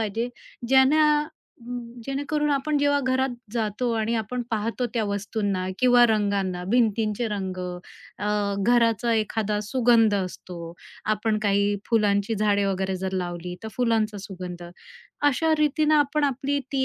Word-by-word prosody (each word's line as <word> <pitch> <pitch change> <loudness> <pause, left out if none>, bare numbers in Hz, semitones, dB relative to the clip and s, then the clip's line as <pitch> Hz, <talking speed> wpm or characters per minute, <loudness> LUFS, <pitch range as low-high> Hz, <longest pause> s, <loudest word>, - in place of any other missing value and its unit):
पाहिजे, 225 +3 -2 0.4
ज्यानं 295 +3 +4 0.8
जेणेकरून 285 +2 -1
आपण 285 +1 +1
जेव्हा 285 0 +2
घरात 260 0 +1 0.2
जातो 230 +1 -1
आणि 225 +1 0
आपण 245 +3 -4
पाहतो 230 +3 -1
त्या 225 -2 +1
वस्तूंना 200 -2 -2
किंवा 245 -1 +6
रंगांना, 200 -4 0
भिंतींचे 225 0 +1
रंग, 190 -3 -4 0.6
अ, 205 +1 -2 0.3
घराचा 230 +1 +2
एखादा 215 -1 -1
सुगंध 230 -3 +4
असतो, 185 -2 -4 0.6
आपण 215 0 -1
काही 200 0 +2
फुलांची 210 -1 +2
झाडे 205 -1 +2
वगैरे 190 -1 -1
जर 190 - -2
लावली, 175 0 -5
तर 220 - -5
फुलांचा 225 -4 +1
सुगंध, 180 -2 -7 0.7
अशा 320 +4 +1
रीतीनं 305 +1 +2
आपण 290 +1 +1
आपली 280 +1 0
ती 265 -1 +1
225 Hz, 130 wpm, -25 LUFS, 200-260 Hz, 0.8 s, किंवा